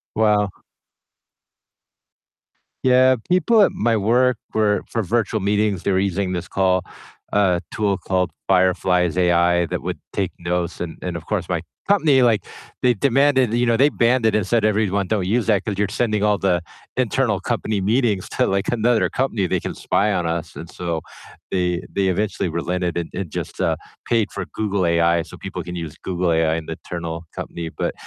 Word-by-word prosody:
Wow. 105 -2 +3 2.3
Yeah, 130 0 +5
people 210 +5 +4
at - - +5
my 115 0 +1
work 120 +4 +3 0.2
were 105 -1 +2
for 115 - -1
virtual 110 +2 0
meetings, 100 -1 0
they 100 - +1
were 95 - +2
using 95 -1 -1
this 85 -1 -4
call, 95 -1 +1 0.5
uh, 95 -4 +3
tool 100 -3 0
called 90 0 -1 0.2
Fireflies 90 -2 +2
AI 85 -1 +3
that - - -3
would - - -4 0.2
take - - -1
notes 85 0 -2
and 85 -2 -5
and 90 -2 -4
of - - -10
course - - -2
my - - 0 0.3
company, 155 -10 +4
like, 115 -3 +3 0.4
they 125 -2 +3
demanded 130 0 +3
you 120 +1 +2
know, 115 -1 +2
they 140 +3 +5
banned 120 -1 +2
it 110 - +3
and 105 -3 0
said, 115 -1 +2
"Everyone 100 -2 +1
don't 105 -4 0
use 115 +3 +1
that, 105 -4 +2
'cause 105 -3 -3
you're 105 -1 +1
sending 105 -1 0
all 105 -1 +2
the 90 -3 +2 0.4
internal - - +1
company 105 -2 -2
meetings 105 -1 +1
to, - - +1
like, 100 +1 0
another 120 0 +2
company, 115 -7 -1
they - - 0
can - - -5
spy 105 +2 +1
on 90 -4 0
us." 85 -1 -3
And 85 - -8
so, 85 -3 -3 0.5
they 90 -2 0
they 100 -1 +1
eventually 95 -1 -1
relented 85 +1 -2
and 85 - -3
and 95 -3 -4
just, - - -5
uh, - - +2 0.3
paid 115 -3 +1
for 95 -3 -4
Google 100 -3 -1
AI 85 0 +3
so 80 - -10
people - - -6
can 90 0 -7
use 80 -3 -6
Google 90 -2 0
AI 80 0 +2
in 80 -1 -4
the 80 - -4
internal 85 -1 -5
company, 85 -1 -5
but, - - -3
100 Hz, 185 wpm, -21 LUFS, 90-110 Hz, 2.3 s, Yeah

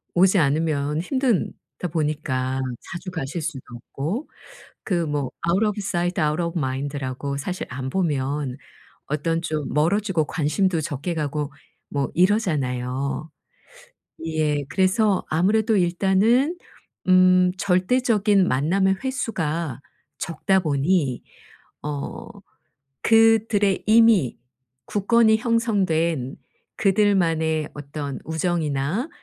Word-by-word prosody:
오지 190 +2 +5
않으면 150 0 +1
힘들다 240 -5 -2
보니까 145 -5 -1 0.3
자주 180 +1 -6
가실 160 -1 -4
수도 155 -3 -4 0.3
없고 185 - -3 0.6
그 175 -4 0
뭐 145 -3 -2 0.2
"out 195 +6 +3
of 210 - +1
sight, 180 -2 -1
out 150 +2 +1
of 170 +1 -2
mind"라고 140 -1 -3
사실 180 +6 -4
안 130 0 -5
보면 145 -5 -1 0.5
어떤 165 +3 -1
좀 155 -3 -3
멀어지고 175 +2 +1
관심도 165 +3 0
적게 155 +2 -3
가고 150 -2 -3 0.4
뭐 140 -1 -1
이러잖아요. 140 - 0 1.0
예. 155 -2 0
그래서 195 +1 +2
아무래도 210 +7 +2
일단은 195 - +2 0.5
음 185 0 +5
절대적인 200 +1 +2
만남의 190 +9 +2
횟수가 170 - -2 0.4
적다 175 +4 0
보니 145 -3 0 0.6
어 145 -1 -5 0.8
그들의 225 -3 +4
이미 220 - +4 0.5
굳건히 220 +2 +3
형성된 185 - 0 0.4
그들만의 170 -6 +2
어떤 145 -1 -6
우정이나 160 - -1
170 Hz, 235 characters per minute, -23 LUFS, 145-195 Hz, 1.0 s, 오지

